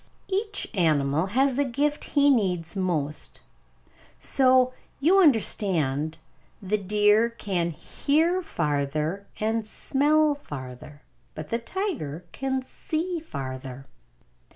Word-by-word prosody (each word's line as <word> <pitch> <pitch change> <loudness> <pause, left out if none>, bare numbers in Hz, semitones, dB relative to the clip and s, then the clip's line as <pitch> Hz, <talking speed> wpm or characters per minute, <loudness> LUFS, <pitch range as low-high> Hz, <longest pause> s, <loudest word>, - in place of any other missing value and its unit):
Each 405 +1 -1
Animal 155 -3 +2
has 265 +5 +1
the 285 - +3
Gift 285 +3 -1
he 285 0 +6
Needs 180 -8 0
Most 155 -6 -1 0.8
So, 255 -1 +3 0.3
you 345 +8 +4
understand, 165 - +2 0.4
the 210 +2 -1
deer 210 +3 +3
can 190 -7 -2
hear 310 - 0
farther 155 - -2
and 220 +1 0
smell 295 +7 +2
farther; 145 - -9 0.3
but 155 -1 -7
the 230 - -1
tiger 230 - -4
can 265 -1 -2
see 330 +6 -2
farther. 135 - -7
210 Hz, 105 wpm, -26 LUFS, -, 0.8 s, he